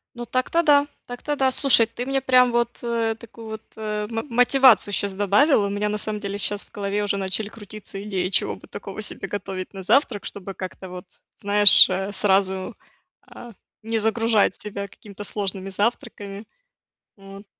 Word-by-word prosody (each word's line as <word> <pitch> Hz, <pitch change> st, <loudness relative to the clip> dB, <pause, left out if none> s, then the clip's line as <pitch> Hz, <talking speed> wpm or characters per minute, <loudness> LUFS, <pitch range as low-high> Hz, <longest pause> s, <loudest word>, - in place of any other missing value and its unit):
Ну, 240 Hz, 0 st, -6 dB
так-то 255 Hz, +8 st, 0 dB
да, 290 Hz, -3 st, +4 dB, 0.2 s
так-то 280 Hz, +4 st, -5 dB
да, 265 Hz, -1 st, +2 dB
слушай, 255 Hz, -4 st, +5 dB
ты 235 Hz, +2 st, -6 dB
мне 270 Hz, +1 st, 0 dB
прям 255 Hz, -1 st, +4 dB
вот, 235 Hz, 0 st, -1 dB
э, 230 Hz, -1 st, -1 dB
такую 230 Hz, 0 st, -13 dB
вот, 220 Hz, 0 st, -7 dB, 0.2 s
э, 210 Hz, -1 st, -4 dB
м 225 Hz, +4 st, -4 dB
мотивацию 250 Hz, -2 st, +4 dB
щас 200 Hz, 0 st, -1 dB
добавила. 205 Hz, -, +3 dB
У -, -, -4 dB
меня 205 Hz, +1 st, -2 dB
на 210 Hz, 0 st, -2 dB
самом 210 Hz, 0 st, -2 dB
деле 200 Hz, 0 st, -5 dB
щас 205 Hz, 0 st, -1 dB
в -, -, -31 dB
голове 205 Hz, 0 st, -3 dB
уже 205 Hz, -1 st, 0 dB
начали 195 Hz, +2 st, -2 dB
крутиться 210 Hz, -2 st, -10 dB
идеи, 190 Hz, -3 st, -2 dB
чего -, -, 0 dB
бы -, -, -17 dB
такого 200 Hz, +1 st, -8 dB
себе 195 Hz, -2 st, -5 dB
готовить 195 Hz, -1 st, -6 dB
на 190 Hz, -, -8 dB
завтрак, 230 Hz, 0 st, +1 dB
чтобы 195 Hz, -1 st, -7 dB
как-то 185 Hz, 0 st, -8 dB
вот, 180 Hz, +2 st, -9 dB, 0.3 s
знаешь, 205 Hz, -1 st, +8 dB
э, 190 Hz, +2 st, -2 dB
сразу, 190 Hz, -1 st, 0 dB, 0.5 s
а, 240 Hz, -, -13 dB, 0.3 s
не 225 Hz, 0 st, -1 dB
загружать 220 Hz, -2 st, +1 dB
себя 200 Hz, -1 st, -6 dB
какими-то 205 Hz, +1 st, -12 dB
сложными 195 Hz, -2 st, -3 dB
завтраками. 205 Hz, -1 st, -3 dB, 0.7 s
Вот. 195 Hz, +1 st, -13 dB
210 Hz, 175 wpm, -23 LUFS, 195-235 Hz, 0.7 s, знаешь